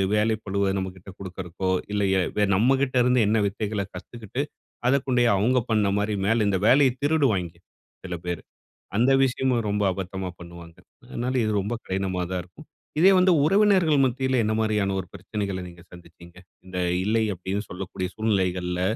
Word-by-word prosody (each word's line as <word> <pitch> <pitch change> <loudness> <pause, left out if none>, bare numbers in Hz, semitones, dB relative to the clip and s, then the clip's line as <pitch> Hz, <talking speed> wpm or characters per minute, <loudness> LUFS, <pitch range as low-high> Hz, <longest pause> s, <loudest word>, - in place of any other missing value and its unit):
வேலை 110 +1 +2
பழுவ 100 0 0
நம்மகிட்ட 95 0 -6
குடுக்கறக்கோ, 95 -1 -5 0.2
இல்ல 105 0 0
எ 95 +3 0
நம்மகிட்ட 130 +5 +2
இருந்து 125 +1 +3
என்ன 110 +2 +2
வித்தைகள 105 +1 -3
கத்துக்கிட்டு 115 +6 -6 0.5
அதக்கொண்டேயே 125 -2 +2
அவங்க 125 +6 +3
பண்ண 105 -2 +3
மாரி, 105 +1 0
மேல 115 +2 +2
இந்த 100 -2 +2
வேலையை 130 +2 +5
திருடுவாய்ங்க 110 - +1 0.5
சில 90 -1 -4
பேர். 90 -2 -3 0.6
அந்த 125 +4 +4
விஷயமும் 125 -2 +1
ரொம்ப 105 0 0
அபத்தமா 95 0 -5
பண்ணுவாங்க. 85 -1 -11 0.3
அதனால 125 +2 -3
இது 110 - 0
ரொம்ப 105 +5 -3
கடினமா 95 -1 -2
தான் 90 -1 -1
இருக்கும். 90 - -16 0.3
இதே 190 +4 +7
வந்து 185 0 +5
உறவினர்கள் 185 -5 +4
மத்தியில 130 0 0
என்ன 110 +1 0
மாரியான 105 -3 +1
ஒரு 95 - -6
பிரச்சனகள 100 0 -4
நீங்க 85 0 -13
சந்திச்சிங்க. 85 0 -15 0.3
இந்த 90 0 -7 0.3
இல்லை 110 +2 +2
அப்டினு 95 +3 -3
சொல்லக்கூடிய 95 0 -5
சூழ்நிலைகள்ல 90 -4 0
105 Hz, 150 wpm, -25 LUFS, 95-125 Hz, 0.6 s, இதே